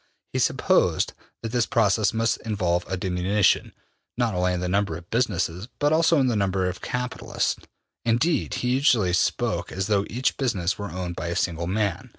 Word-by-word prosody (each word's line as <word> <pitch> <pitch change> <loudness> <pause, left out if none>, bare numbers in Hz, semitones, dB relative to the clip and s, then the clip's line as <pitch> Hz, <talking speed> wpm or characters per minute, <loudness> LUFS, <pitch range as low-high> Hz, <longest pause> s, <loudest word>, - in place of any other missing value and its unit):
He - - 0
supposed - - +2 0.3
that 115 - -3
this 120 -1 +1
process 110 -2 +2
must 115 0 +1
involve 90 -5 -1
a 95 - 0
diminution, 95 +2 +1 0.5
not 120 -4 +1
only 90 0 +1
in 90 - -1
the 90 - -2
number 95 -3 0
of 85 0 -13
businesses, 100 -5 0
but 145 +1 +2
also 160 0 +4
in 135 - +3
the 120 -3 +1
number 95 -2 +1
of 90 0 -5
capitalists. 125 0 -2 0.5
Indeed, 125 +8 +1
he 125 - -1
usually 125 - +3
spoke 90 - 0
as 95 0 -2
though 100 -1 +1
each 125 +4 -1
business 100 -9 0
were 100 -1 -4
owned 90 0 -5
by 85 - -4
a 85 - -2
single 85 -1 -1
man. 100 -1 -1
100 Hz, 180 wpm, -25 LUFS, 90-120 Hz, 0.5 s, also